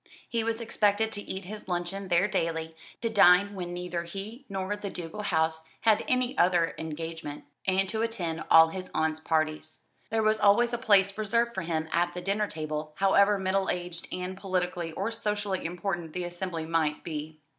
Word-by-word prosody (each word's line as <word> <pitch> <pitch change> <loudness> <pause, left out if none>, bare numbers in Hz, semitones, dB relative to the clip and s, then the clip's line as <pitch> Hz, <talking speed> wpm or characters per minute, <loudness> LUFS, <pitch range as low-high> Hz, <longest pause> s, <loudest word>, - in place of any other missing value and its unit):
He 230 -1 -1
was 225 0 -1
expected 220 -1 +1
to 205 - -4
eat 190 -2 -6
his 210 +2 -8
luncheon 180 +2 -3
there 175 +2 +3
daily, 165 -4 -2 0.3
to 230 - +1
dine 200 -1 +6
when 180 -3 -5
neither 175 -1 -3
he 205 +9 -7
nor 195 +1 -2
the 205 -1 -5
ducal 175 +3 -6
house 160 -4 0 0.2
had 220 -2 +4
any 255 +1 +1
other 175 -2 +3
engagement, 160 -1 -5 0.2
and 190 0 +3
to 220 -1 -1
attend 180 -8 -2
all 160 0 +8
his 185 +2 -6
aunt's 160 0 +1
parties. 155 0 -1 0.3
There 220 0 +1
was 215 0 +3
always 235 +4 +4
a 240 - -1
place 200 -5 +4
reserved 235 +3 +1
for 190 - -2
him 160 -2 -2
at 175 +1 +1
the 180 - -4
dinner 205 +2 0
table, 155 -2 -4
however 200 +2 +4
middle 190 0 0
aged 175 -1 -3
and 180 +1 -4
politically 180 -3 -2
or 200 +6 -2
socially 210 -4 -2
important 175 -1 -3
the 180 - -3
assembly 175 -2 -4
might 160 -2 0
me. 155 -1 -5
185 Hz, 180 wpm, -28 LUFS, 165-205 Hz, 0.3 s, all